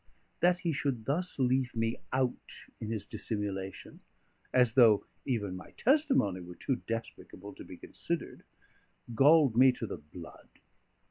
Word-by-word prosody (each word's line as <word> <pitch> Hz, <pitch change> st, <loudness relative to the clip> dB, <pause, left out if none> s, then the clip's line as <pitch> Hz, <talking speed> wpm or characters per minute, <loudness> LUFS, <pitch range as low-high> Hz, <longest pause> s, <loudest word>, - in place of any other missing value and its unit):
That 180 Hz, 0 st, +3 dB
he 170 Hz, -3 st, 0 dB
should 135 Hz, -5 st, -2 dB
thus 175 Hz, +6 st, -1 dB
leave 130 Hz, -1 st, +1 dB
me 115 Hz, +1 st, 0 dB
out 130 Hz, -1 st, -2 dB
in 110 Hz, -, -5 dB
his 110 Hz, -3 st, -3 dB
dissimulation, 100 Hz, -3 st, -4 dB, 0.5 s
as 125 Hz, -3 st, +4 dB
though 115 Hz, -5 st, +5 dB, 0.2 s
even 105 Hz, -8 st, -1 dB
my 90 Hz, -, -11 dB
testimony 265 Hz, -, +2 dB
were 90 Hz, 0 st, -10 dB
too 130 Hz, +6 st, -2 dB
despicable 115 Hz, 0 st, -6 dB
to -, -, -11 dB
be -, -, -11 dB
considered, -, -, -5 dB, 0.7 s
galled 140 Hz, 0 st, +5 dB
me 130 Hz, +2 st, +7 dB
to 120 Hz, -, -5 dB
the -, -, -5 dB
blood. 75 Hz, +3 st, -13 dB
120 Hz, 140 wpm, -31 LUFS, 105-135 Hz, 0.7 s, me